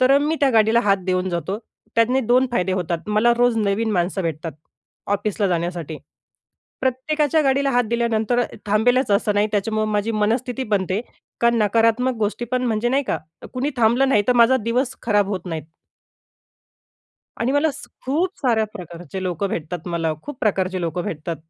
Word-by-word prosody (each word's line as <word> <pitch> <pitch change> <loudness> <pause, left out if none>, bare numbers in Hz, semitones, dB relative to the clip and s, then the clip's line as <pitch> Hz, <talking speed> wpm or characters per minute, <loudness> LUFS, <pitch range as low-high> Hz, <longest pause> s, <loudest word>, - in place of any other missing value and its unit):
तर 255 +1 +4
अ, - - +6
मी 300 +2 0
त्या 280 -2 +4
गाडीला 225 0 +4
हात 200 -1 +3
देऊन 185 0 0
जातो. 175 +4 -3 0.4
त्याने 235 +3 +3
2 255 +2 +5
फायदे 185 -5 +1
होतात 175 -1 -3
मला 215 +3 +3
रोज 245 -1 +3
नवीन 215 +1 0
माणसं 185 +1 0
भेटतात 165 0 -3 0.6
ऑफिसला 205 0 -1
जाण्यासाठी. 170 -3 -3 0.8
प्रत्येकाच्या 290 +4 +1
गाडीला 275 0 +2
हात 245 -1 +2
दिल्यानंतर 235 0 +1
अ - - +2 0.2
थांबेलच 240 +5 +2
असं 205 +1 +2
नाही, 205 +1 +3
त्याच्यामुळं 215 +1 0
माझी 210 +2 0
मनस्थिती 235 +5 0
बनते, 190 +1 0 0.4
कारण 235 0 +3
नकारात्मक 230 +4 +2
गोष्टी 215 +2 -1
पण 255 0 +1
म्हणजे 225 0 0
नाही 270 +3 +2
का, - - -1 0.3
कोणी 265 +3 -1
थांबलं 240 +3 +3
नाही, 210 -6 +4
तर - - +6
माझा 255 +3 +5
दिवस 250 +3 0
खराब 205 -3 +2
होत 190 -3 -4
नाहीत. 165 -3 -4 1.8
आणि 245 +3 +1
मला 285 +3 +3 0.4
खूप 335 +9 -1
साऱ्या 230 -5 +2
प्रकारचे 175 -1 -8
लोकं 185 +1 -2
भेटतात, 170 0 -5
मला 165 -2 -1
खूप 290 -3 -8
प्रकारचे 190 -3 0
लोकं 170 +1 -2
भेटतात. 165 -3 -4
220 Hz, 165 wpm, -21 LUFS, 185-250 Hz, 1.8 s, अ